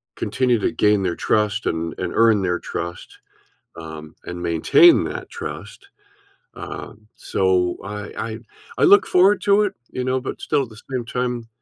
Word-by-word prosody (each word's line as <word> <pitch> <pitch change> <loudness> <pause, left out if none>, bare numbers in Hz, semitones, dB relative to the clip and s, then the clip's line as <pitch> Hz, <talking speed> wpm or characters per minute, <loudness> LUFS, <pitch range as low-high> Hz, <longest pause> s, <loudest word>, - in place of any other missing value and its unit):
continue 125 -3 0
to - - 0
gain 105 -2 +2
their 85 -2 -1
trust 105 0 0
and 80 0 -3
and - - -3
earn 110 -3 +4
their 90 -1 0
trust, 85 +1 -7 0.6
um, 80 -1 -9
and 90 0 -6
maintain 85 -2 +5
that - - -6
trust, - - -8 0.7
um, 105 0 -9
so, 90 -2 0
I 105 +1 -6
I 110 -1 -4 0.4
I - - +3
look 200 -1 +7
forward 190 +3 +4
to 205 +1 +4
it, 205 - -1 0.2
you 125 - -3
know, 130 +1 0
but 130 - -6
still 145 -2 +1
at 125 - -9
the 110 0 -14
same 125 -3 -2
time 125 -1 -3
105 Hz, 165 wpm, -21 LUFS, 90-125 Hz, 0.7 s, look